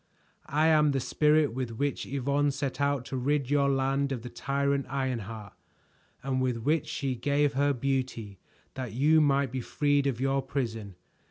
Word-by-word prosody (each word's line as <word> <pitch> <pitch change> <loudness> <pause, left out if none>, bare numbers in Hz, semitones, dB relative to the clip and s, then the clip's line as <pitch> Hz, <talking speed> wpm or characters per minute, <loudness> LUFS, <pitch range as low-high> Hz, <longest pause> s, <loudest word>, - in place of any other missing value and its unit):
"I 150 +3 +2
am 150 -2 +4
the 135 - +1
Spirit 150 +1 +2
with 120 -3 -4
which 140 +1 -2
Yvonne 140 +2 0
set 140 -1 -3
out 140 -3 0
to 135 - -4
rid 140 +1 0
your 140 -1 +3
land 135 +1 0
of 125 -4 -4
the 125 - -8
tyrant 140 0 -1
Ironheart, 115 -6 -4 0.7
and 130 -1 -1
with 125 -2 0
which 150 +7 0
she 135 -2 -2
gave 145 +3 +1
her 140 +2 +2
beauty 125 -6 -2 0.3
that 130 -4 -5
you 155 +6 +4
might 140 -3 +2
be 130 0 -3
freed 145 +2 +1
of 125 -4 -2
your 135 +1 +1
prison. 115 -7 -4
135 Hz, 170 wpm, -28 LUFS, 125-145 Hz, 0.7 s, am